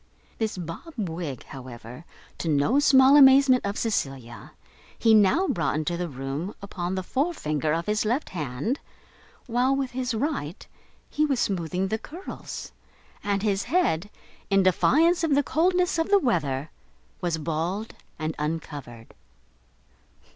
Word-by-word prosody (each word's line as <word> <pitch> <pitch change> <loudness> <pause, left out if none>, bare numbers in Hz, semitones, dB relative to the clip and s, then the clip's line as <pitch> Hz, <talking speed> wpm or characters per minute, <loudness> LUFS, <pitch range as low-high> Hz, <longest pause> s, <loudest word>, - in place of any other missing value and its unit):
This 220 -3 -1
bob 175 - -7
wig, 165 - -4
however, 125 +2 -10 0.3
to - - -3
the 155 - +2
no 185 - +3
small 270 -1 +6
amazement 270 -2 +7
of 200 +1 -3
Cecilia, 135 - -3 0.4
he 225 - +4
now 220 - +4
brought 165 - 0
into 155 +3 -1
the 175 0 -3
room 135 +7 -5
upon 190 -2 -4
the 185 - -2
forefinger 170 - -1
of 165 +2 -1
his 210 0 0
left 240 +7 -1
hand, 155 - -3 0.7
while, 250 +2 +1
with 270 -2 -2
his 250 -1 -2
right, 220 - -3 0.4
he 305 - 0
was 275 -5 +1
smoothing 185 -1 -1
the 220 - -1
curls; 340 - -8 0.5
and 200 -1 -1
his 200 -2 0
head, 235 - +1 0.4
in 195 -1 +4
defiance 320 - +3
of 310 -4 +2
the 285 - +3
coldness 360 +3 +1
of 325 - 0
the 405 - +6
weather, 155 - -1 0.5
was 175 -3 -1
bald 165 +7 -3 0.2
and 155 0 -3
uncovered. 145 -7 -5
195 Hz, 140 wpm, -26 LUFS, 155-265 Hz, 0.7 s, amazement